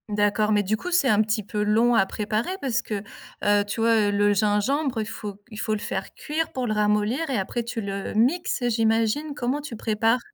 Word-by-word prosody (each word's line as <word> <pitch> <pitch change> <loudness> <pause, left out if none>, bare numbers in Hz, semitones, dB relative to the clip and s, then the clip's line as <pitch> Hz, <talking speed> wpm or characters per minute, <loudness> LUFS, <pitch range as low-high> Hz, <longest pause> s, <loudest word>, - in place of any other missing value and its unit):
D'accord, 205 +1 +1
mais 205 -1 +3
du 205 +3 0
coup, 360 - -6
c'est 345 -6 +3
un 215 -4 +4
petit 215 0 0
peu 210 +1 -2
long 225 +3 +3
à 195 - +4
préparer 215 - -2
parce 260 -2 0
que, 210 -4 -4 0.4
heu, 205 0 +4
tu 205 +3 -4
vois, 225 -2 +3
le 205 0 +3
gingembre, 220 +6 +1
il 215 - -1
faut 210 -1 -6
c - - -20
il 215 - -7
faut 215 - -1
le 215 - -1
faire 195 -1 -4
cuire 320 +2 -3
pour 255 -2 -2
le 215 - 0
ramollir 210 +8 +1
et 260 - 0
après 220 +5 -2
tu 235 0 -4
le 200 -1 -4
mixes, 255 +5 +1
j'imagine, 225 +6 +1
comment 260 +3 -1
tu 285 -5 -7
prépares? 225 +2 +1
220 Hz, 220 wpm, -25 LUFS, 210-245 Hz, 0.4 s, un